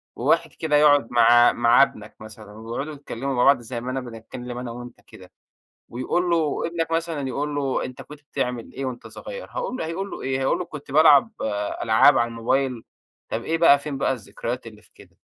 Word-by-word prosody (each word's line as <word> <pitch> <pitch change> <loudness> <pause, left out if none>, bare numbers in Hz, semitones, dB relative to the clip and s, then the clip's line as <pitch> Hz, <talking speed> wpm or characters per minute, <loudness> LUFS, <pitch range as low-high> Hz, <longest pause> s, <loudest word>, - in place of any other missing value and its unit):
وواحد - - +1
كده 155 -2 -1
يقعد 145 -4 +5
مع 120 0 +6
مع 120 +3 +5
ابنك 105 -5 -5
مثلًا 110 -1 -12
ويقعدوا 115 +8 -6
يتكلموا 140 -2 -5
مع 125 - +2
بعض 140 -1 +5
زي 120 0 -6
ما 125 +1 -4
أنا 135 - -2
بنتكلم 120 +1 -8
أنا 125 -1 -5
وأنت 120 0 -10
كده - - -15 0.6
ويقول 175 +9 -1
له 165 -2 0
ابنك 165 -1 -3
مثلًا 165 -4 -2
يقول 145 +3 -3
له 135 -2 -1
أنت 130 - -9
كنت 150 0 -13
بتعمل 125 -5 -4
إيه 135 - -4
وأنت 125 -2 -6
صغيّر؟ - - -9
هاقول - - -4
له 160 - -3
هيقول 190 +5 -4
له - - -7
إيه، 130 0 -2
هيقول 135 +6 0
له 180 - -3
كنت 150 -4 -10
بالعب 155 +6 +6 0.5
ألعاب 115 +5 +5
على 120 - +2
الموبايل، 120 +1 -1 0.5
طب 115 - -3
إيه 165 +5 -1
بقى 160 -4 +6
فين 140 -1 -5
بقى 135 - +1
الذكريات 115 +1 -6
اللي 105 -1 -13
في - - -26
كده؟ - - -19
135 Hz, 200 wpm, -23 LUFS, 120-150 Hz, 0.6 s, مع